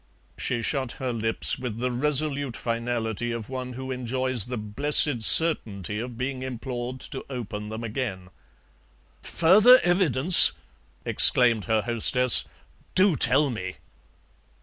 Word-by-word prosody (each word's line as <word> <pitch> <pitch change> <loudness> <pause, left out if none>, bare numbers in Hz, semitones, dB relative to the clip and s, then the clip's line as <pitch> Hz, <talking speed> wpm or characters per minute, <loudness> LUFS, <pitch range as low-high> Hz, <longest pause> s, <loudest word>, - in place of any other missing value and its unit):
She 120 -2 -5
shut 130 0 -4
her 130 -2 -6
lips 115 0 -2
with 125 -4 -7
the 125 +2 -4
resolute 140 0 -1
finality 115 -1 -5
of 115 -2 -8
one 130 -1 -8
who 130 +1 -9
enjoys 130 -2 -1
the 125 0 -7
blessed 130 +4 0
certainty 105 - +1
of 120 0 -9
being 130 +1 -6
implored 125 0 -8
to 135 - -9
open 105 -5 -8
them 110 +2 -8
again. 105 -6 -7 0.9
"Further 210 +9 +3
evidence!" 175 -3 +7 0.5
exclaimed 120 -4 +3
her 110 -2 -2
hostess; 120 +1 +2 0.5
"do 185 -2 +2
tell 135 +2 +1
me!" 95 -5 -8
125 Hz, 125 wpm, -23 LUFS, 115-135 Hz, 0.9 s, evidence